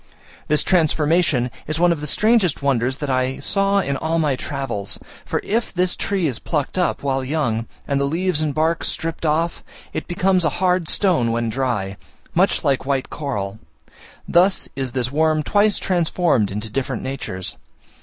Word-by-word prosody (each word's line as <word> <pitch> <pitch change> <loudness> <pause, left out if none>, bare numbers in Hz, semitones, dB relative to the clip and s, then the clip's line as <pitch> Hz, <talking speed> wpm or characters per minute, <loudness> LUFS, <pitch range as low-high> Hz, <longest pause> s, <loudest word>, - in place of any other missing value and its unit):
This 150 0 +3
transformation 155 -6 +2 0.2
is 155 +1 -2
one 175 0 +5
of 165 -3 -1
the 150 - -3
strangest 210 -5 +2
wonders 130 -1 +1
that 145 -1 -4
I 130 +1 0
saw 195 0 +1
in 140 -6 -2
all 160 +3 -1
my 150 -4 +2
travels: 135 -8 -3 0.3
for - - -1
if 225 +3 -1
this 180 -1 +1
tree 195 -4 -1
is 130 -7 0
plucked 150 -4 -2
up, 180 -5 0
while 135 -1 0
young, 130 -6 -1 0.2
and 140 -1 +1
the - - +2
leaves 165 +2 +1
and 155 -1 0
bark 160 +3 0
stripped 165 0 -2
off, 165 +2 0 0.3
it 155 - -4
becomes 185 0 +2
a 160 - +3
hard 180 -3 +1
stone 165 - +2
when 115 0 0
dry, 110 -7 -2 0.4
much 185 +4 +2
like 140 -4 +1
white 135 -1 -1
coral: 105 -8 -4 0.7
thus 185 +2 +3
is 130 -3 -3
this 130 -1 -1
worm 155 +1 +2
twice 205 +5 +3
transformed 170 - +1
into 105 +2 -4
different 130 0 -2
natures. 125 -9 -4
150 Hz, 170 wpm, -21 LUFS, 130-175 Hz, 0.7 s, one